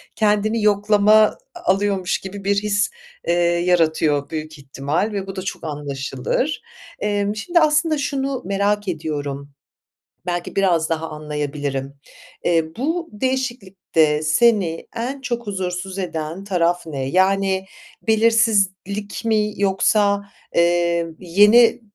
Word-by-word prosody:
kendini 215 +1 +1
yoklama 210 0 +4
a 215 0 +5 0.4
alıyormuş 195 -2 0
gibi 195 +1 -8
bir 200 +1 +2
his, 205 -1 +1 0.4
eee, 170 - +3
yaratıyor 165 -4 +2
büyük 155 -1 -6
ihtimal 140 +8 -2
ve 195 -1 -3
bu 195 - -6
da 185 - -4
çok 185 - -6
anlaşılır. 145 - -3 0.4
Emm, 205 0 -1
şimdi 340 +10 +1
aslında 310 0 +3
şunu 275 -2 -2
merak 200 +1 0
ediyorum, 145 -4 -4 0.7
belki 175 -1 -3
biraz 175 -5 +2
daha 165 0 -2
anlayabilirim. 145 -2 -4 0.5
Eee, 165 -2 +2
bu 330 +7 -2
değişiklikte 200 -11 0
seni 175 0 +2
en 260 +4 -4
çok 240 -4 -4
huzursuz 185 -1 -4
eden 165 0 -4
taraf 175 -3 0
ne? 140 -4 -4
Yani, 190 +4 +2 0.4
belirsizlik 210 -2 +1
mi 210 -2 +1
yoksa, 200 +1 +2 0.3
eee, 170 0 +2
yeni 210 +7 +5
195 Hz, 115 wpm, -21 LUFS, 165-210 Hz, 0.7 s, a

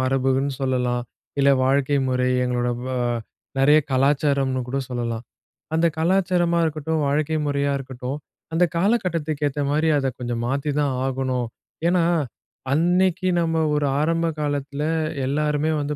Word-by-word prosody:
மரபுன்னு 135 +1 +1
சொல்லலாம். 125 -2 0 0.4
இல்ல 140 0 +5
வாழ்க்கை 140 +1 +2
முறை 125 0 +1 0.2
எங்களோட 125 -1 0 0.2
வ - - -5 0.7
நறைய 145 +3 +6
கலாச்சாரம்னுகூட 135 -1 +1
சொல்லலாம். 120 -2 -3 0.5
அந்த 165 +1 +3
கலாச்சாரமா 175 -1 +2
இருக்கட்டும், 155 0 -1
வாழ்க்கை 155 +2 +1
முறையா 140 0 0
இருக்கட்டும், 130 +1 -5 0.4
அந்த 170 - +3
காலகட்டத்துக்கு 170 -7 0
ஏத்தமாரி 145 +3 0
அத 135 - 0
கொஞ்சம் 120 -1 -3
மாத்தித்தான் 140 0 0
ஆகணும். 130 -2 -1 0.4
ஏன்னா, 175 -1 +3 0.7
அன்னைக்கி 180 +3 +2
நம்ம 165 -1 0 0.2
ஒரு 150 -1 +1 0.2
ஆரம்ப 165 +2 +1
காலத்தில 145 0 -2 0.4
எல்லாருமே 150 +2 +1
வந்து 145 +1 -2
145 Hz, 115 wpm, -23 LUFS, 130-160 Hz, 0.7 s, நறைய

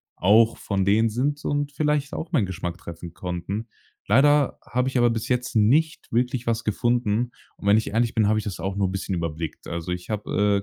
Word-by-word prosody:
auch 110 +5 +4
von 100 -2 -1
denen 110 +3 +3
sind 140 +6 -1
und 145 0 -1
vielleicht 150 -1 0
auch 165 +2 -5
meinen 120 - +2
Geschmack 90 -1 -4
treffen 85 0 -9
konnten. 90 +5 -4 0.4
Leider 140 +5 +4
habe 125 +1 0
ich 130 - -2
aber 120 -1 +4
bis 115 -1 -3
jetzt 125 0 -1
nicht 150 +10 +2
wirklich 125 +1 0
was 115 0 0
gefunden. 120 +1 0 0.3
Und - - -6
wenn 105 +2 +6
ich 110 - -1
ehrlich 115 +2 +1
bin, 110 -2 +3
habe 110 0 +2
ich - - -6
das 95 -5 -5
auch 95 +2 -3
nur 100 -1 +1
'n - - -4
bisschen 95 0 -3
überblickt. 80 -1 -4
Also 85 +1 -4
ich 90 +2 -5
habe, 105 -1 +1
110 Hz, 210 wpm, -24 LUFS, 95-125 Hz, 0.4 s, wenn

